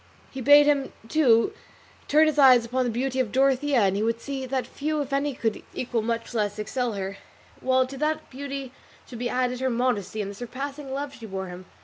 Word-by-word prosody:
He 265 - -6
bade 290 +3 +7
him, 285 -2 +1 0.2
too, 270 - +4 0.5
turn 305 +2 +5
his 305 -1 +1
eyes 255 -4 +7
upon 255 +2 0
the - - 0
beauty 260 +3 -1
of 240 -5 0
Dorothea 270 0 +3
and 195 -1 +2
he 205 - -1
would 230 +1 0
see 270 0 -5
that 260 0 -1
few 305 +1 -3
if 280 -1 -3
any 280 0 0
could 225 -3 -2
equal 240 -2 -1
much 230 +1 -3
less 210 -2 -1
excel 235 +3 -2
her; 195 0 -4 0.4
while 260 0 +2
to 270 +1 -9
that 305 +1 -1
beauty 275 -1 -6 0.4
should 240 - -9
be 245 0 -1
added 250 0 0
her 260 0 0
modesty 235 -4 -1
and 200 -1 -3
the - - -8
surpassing 270 +5 -6
love 280 +1 -4
she 230 -4 -10
bore 190 -2 -5
him. 180 0 -10
255 Hz, 215 wpm, -25 LUFS, 230-275 Hz, 0.5 s, bade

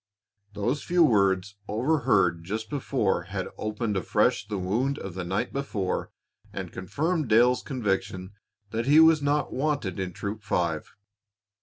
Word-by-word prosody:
Those 120 +8 -1
few 175 -1 +3
words 100 - +2
overheard 105 - +2
just 110 +5 -4
before 120 - 0
had 95 0 -4
opened 110 0 -2
afresh 105 +4 +1
the 105 -2 -3
wound 115 +10 0
of 95 - -6
the 90 0 -4
night 95 +7 -2
before 110 -9 -2 0.4
and - - -6
confirmed 155 - -1
Dale's 120 +3 +4
conviction 95 -7 -2 0.4
that 115 +2 -2
he 150 +3 +7
was 160 -1 +6
not 145 +1 0
wanted 135 - -1
in 95 -1 -2
Troop 105 +4 -5
Five. 85 -6 -2
110 Hz, 140 wpm, -27 LUFS, 95-135 Hz, 0.4 s, he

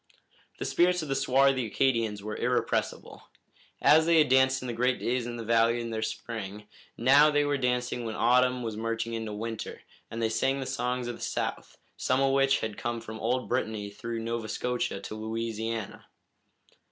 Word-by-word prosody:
The - - -4
spirits 180 -1 +2
of 150 - -7
the 135 - 0
swarthy 135 -2 +3
Acadians 115 -4 0
were 105 0 -4
irrepressible. - - -2 0.6
As 160 +2 +6
they 170 -1 +5
had 150 -3 +5
danced 130 0 +4
in - - -5
the 120 - -3
great 125 +2 +1
days 120 0 -1
in 120 - -5
the 115 - -5
valley 115 +1 +3
in 115 -1 -4
the 110 -1 -2
spring, 105 -2 -5 0.3
now 140 +5 +6
they 145 -1 +2
were 145 0 +1
dancing 125 -2 -1
when 110 -1 -4
autumn 125 0 +3
was 110 -2 -4
merging 115 +1 -3
into 110 -1 -4
winter, 110 +1 -5 0.3
and 115 - -6
they 115 - +2
sang 115 +5 +1
their 135 - -4
songs 125 -1 -2
of 120 - -5
the - - -15
South, - - -3 0.2
some 130 +1 +1
of 135 0 +2
which 135 0 +3
had 110 -2 -4
come 120 0 -2
from 110 0 -8
old 125 +3 -1
Brittany 110 -4 -2
through 115 +3 -5
Nova 115 -1 -3
Scotia 125 -5 -2
to 100 - -7
Louisiana. 110 0 -4
120 Hz, 190 wpm, -28 LUFS, 110-130 Hz, 0.6 s, As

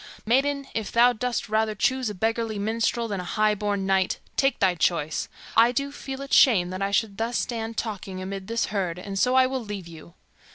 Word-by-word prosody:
Maiden, 275 +4 +1
if 220 -2 -3
thou 245 +1 +5
dost 245 +1 -2
rather 215 0 0
choose 260 +3 +1
a 210 - -6
beggarly 225 +2 -1
minstrel 230 +3 0
than 200 -3 -3
a - - -4
high 215 +3 +1
born 205 -1 -2
knight, 190 -1 +1 0.2
take 270 0 +2
thy 190 -2 +3
choice. 160 -3 0 0.3
I 230 +2 +6
do 280 +3 -2
feel 270 -1 -6
it 275 - -7
shame 185 -9 +5
that 185 +1 -5
I 195 - +1
should 200 0 0
thus 230 +2 -1
stand 225 -2 -3
talking 195 -4 -4
amid 190 0 -6
this 230 +1 0
herd, 180 -4 -1
and 195 +1 -5
so 250 +4 +3
I 260 0 +6
will 260 -1 -2
leave 205 -4 -6
you." 170 +1 -13
215 Hz, 210 wpm, -25 LUFS, 195-240 Hz, 0.3 s, I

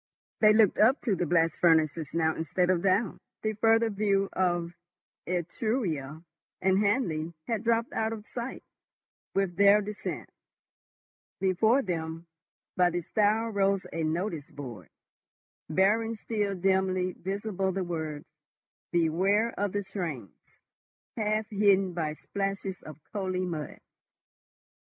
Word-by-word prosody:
They 215 -1 +7
looked 215 -3 +4
up 250 +6 +5
to 220 -7 +1
the 175 -1 -1
blast 165 0 +2
furnaces 160 -2 +2
now 160 -1 +1
instead 180 +3 +1
of 175 -2 +1
down; 195 +4 +1 0.2
the 215 0 0
further 225 +1 +3
view 200 -1 +1
of 175 -2 0 0.5
Etruria 170 - -2 0.4
and 190 0 +3
Hanley 170 -7 0
had 225 -2 -2
dropped 230 0 +1
out 220 0 0
of 215 -2 -6
sight 240 +2 -5 0.7
with 195 -3 0
their 200 +1 +7
descent. 210 0 -5 1.1
Before 220 +8 +3
them, 165 -2 -4 0.5
by 180 -1 +4
the 175 0 -2
stile 215 +5 +1
rose 195 -2 +1
a 165 - -2
notice 160 -1 -2
board, 120 - -9 0.8
bearing 215 +7 +2
still 210 -2 -2
dimly 185 0 +1
visible, 195 +1 -2
the 190 0 -2
words, 160 -4 -4 0.7
"BEWARE 190 +7 +2
OF 205 -1 -1
THE 205 +1 -2
TRAINS," 170 - -5 0.8
half 215 -1 0
hidden 195 -2 +3
by 160 -3 -2
splashes 195 +1 -4
of 155 -3 -10 0.2
coaly 185 -2 -1
mud. 160 -5 -5
190 Hz, 125 wpm, -28 LUFS, 170-210 Hz, 1.1 s, They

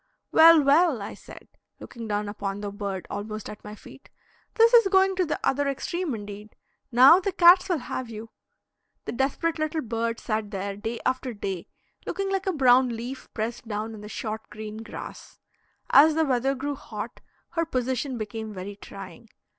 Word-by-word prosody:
"Well, 325 -1 +8
well," 290 -1 +4
I 200 - -6
said, - - -13 0.3
looking 230 -2 -9
down 210 0 -1
upon 205 -1 -4
the 205 -1 -4
bird 200 -2 -5
almost 215 +1 -5
at 210 - -12
my 210 0 -8
feet, - - -15 0.5
"this 460 +1 +5
is 465 -4 +7
going 385 0 +3
to 370 - +2
the 300 - -2
other 285 +1 +1
extreme 285 +2 -2
indeed; 205 0 -9 0.4
now, 260 +8 +8
the 395 +1 -2
cats 360 +2 +6
will 355 - +2
have 255 -2 -5
you." 225 0 -9 0.7
The - - -3
desperate 290 +6 -1
little 310 +1 -1
bird 230 0 -2
sat 215 -2 -2
there 200 -1 -4
day 225 +3 -5
after 255 -2 -1
day, 195 -4 -5 0.4
looking 390 +2 -2
like 390 0 -1
a - - +3
brown 260 -4 +4
leaf 240 +3 -7
pressed 230 +1 -4
down 215 +1 -4
in 215 - -10
the 210 - -9
short 220 0 -5
green 215 0 -8
grass. 225 +1 -9 0.5
As 305 +2 +7
the 320 0 +2
weather 270 0 +1
grew 285 +2 -3
hot, 275 - -8 0.3
her 330 -1 -1
position 260 -3 -2
became 220 0 -5
very 195 +2 -7
trying. - - -11
240 Hz, 180 wpm, -26 LUFS, 215-310 Hz, 0.7 s, Well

